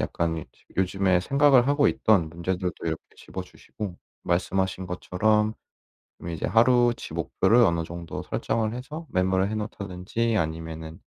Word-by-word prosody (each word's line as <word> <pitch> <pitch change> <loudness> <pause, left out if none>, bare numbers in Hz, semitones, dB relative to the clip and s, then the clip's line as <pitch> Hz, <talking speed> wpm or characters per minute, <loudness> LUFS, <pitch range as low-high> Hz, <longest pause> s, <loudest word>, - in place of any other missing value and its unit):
약간 80 -1 -1
요즈 80 - -12
요즘에 95 -1 +2
생각을 140 +3 +4
하고 145 0 +4
있던 95 -8 +3
문제들도 90 +2 -2
이렇게 80 -1 -1 0.2
집어 - - -7
주시고 100 -5 -8 0.3
말씀하신 95 +1 0
것처럼 105 +4 +1 0.8
이제 80 - -3
하루치 120 +1 +3
목표를 110 +6 +2
어느 85 -5 +2
정도 85 0 -6
설정을 110 0 -1
해서 150 +6 -7
메모를 95 +1 +1
해 - - -2
놓다든지 105 +2 -2
아니면은 80 0 -4
95 Hz, 335 characters per minute, -26 LUFS, 85-115 Hz, 0.8 s, 생각을